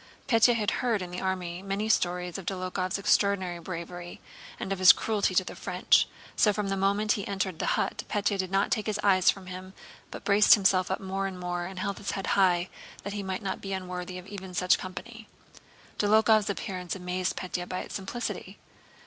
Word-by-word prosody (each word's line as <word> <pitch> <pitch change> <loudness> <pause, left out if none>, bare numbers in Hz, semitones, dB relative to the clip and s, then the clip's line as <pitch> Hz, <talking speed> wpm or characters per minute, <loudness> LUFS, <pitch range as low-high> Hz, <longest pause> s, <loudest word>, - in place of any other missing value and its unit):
Pétya 235 -1 +5
had 215 -2 0
heard 230 -6 +1
in 175 - -7
the 180 - -5
army 185 -2 -3
many 200 +2 -2
stories 180 -3 0
of 185 - -11
Dólokhov's 185 0 -2
extraordinary 195 -3 +1
bravery 175 0 -7 0.4
and 195 - -2
of 195 - -5
his 185 -1 +9
cruelty 205 -4 0
to 185 - +4
the - - -8
French, - - +2 0.3
so 210 - +4
from 205 -1 -2
the 195 - 0
moment 200 +2 +1
he 200 - -1
entered 190 -4 -2
the - - +1
hut - - -1
Pétya 205 -1 +1
did 185 -1 -1
not 195 +2 +1
take 215 - 0
his 210 -1 -1
eyes 190 -3 +5
from 195 -1 -1
him, 185 +1 -9 0.3
but - - -8
braced 205 +2 +7
himself 190 -3 +2
up 190 - -2
more 195 0 -2
and 185 -1 -7
more 175 -1 -3
and 190 +1 -8
held 200 +2 -3
his 200 - -5
head 195 - -3
high, 180 -2 +3 0.4
that 200 - -5
he 205 - -3
might 190 +1 -4
not 190 -1 -3
be 195 -1 -4
unworthy 180 -1 -5
even 195 -1 -8
of 180 - -7
such 180 -1 +3
company. 215 +5 -8 0.7
Dólokhov's 215 0 +4
appearance 185 -3 -4
amazed 180 0 -2
Pétya 180 -1 -4
by 185 - -3
its - - -9
simplicity. 205 +5 -5
190 Hz, 200 wpm, -28 LUFS, 180-200 Hz, 0.7 s, his